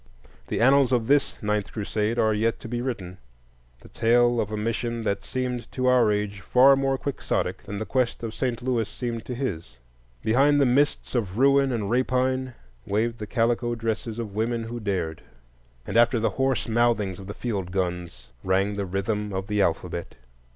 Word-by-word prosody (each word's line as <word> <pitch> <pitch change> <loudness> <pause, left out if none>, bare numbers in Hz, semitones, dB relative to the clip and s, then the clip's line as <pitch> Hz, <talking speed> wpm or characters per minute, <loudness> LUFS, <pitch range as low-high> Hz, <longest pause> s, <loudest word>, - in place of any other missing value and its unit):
The - - -2
annals 135 +1 +5
of 120 -3 +2
this 140 +3 +2
Ninth 105 -1 -1
Crusade 105 +1 -1
are 110 -2 +3
yet 110 +2 0
to - - -7
be 120 +1 -3
written,—the 60 - -9
tale 120 +1 +3
of 105 - -4
a 110 - -2
mission 115 +2 -2
that 100 -2 -1
seemed 125 -2 -3
to 130 - -1
our 125 -4 +4
age 105 -1 -2
far 130 +7 +5
more 135 0 0
quixotic 140 +1 -2
than 100 - -5
the 110 - -3
quest 125 -1 -1
of 110 -1 -4
St. 120 0 -2
Louis 120 -4 0
seemed 120 -2 -5
to 125 - -5
his. 85 - -4 0.5
Behind 140 +6 +4
the 140 - +5
mists 140 +4 +1
of 105 -6 -1
ruin 135 +1 +4
and 110 -5 -2
rapine 130 0 0 0.3
waved 115 +3 -1
the 105 - -5
calico 120 +1 +1
dresses 115 0 -3
of 110 -4 -5
women 115 +2 -1
who 120 +1 -5
dared, 95 -7 -2 0.6
and - - -5
after 120 0 +4
the 115 - +1
hoarse 135 -2 0
mouthings 115 -5 +1
of 95 - -9
the 100 - -6
field 100 -7 -3
guns 90 -6 -3
rang 95 +2 +1
the 100 -1 -2
rhythm 105 +3 -2
of 95 0 -3
the 105 0 0
alphabet. 85 -1 -2
115 Hz, 180 wpm, -25 LUFS, 100-125 Hz, 0.6 s, annals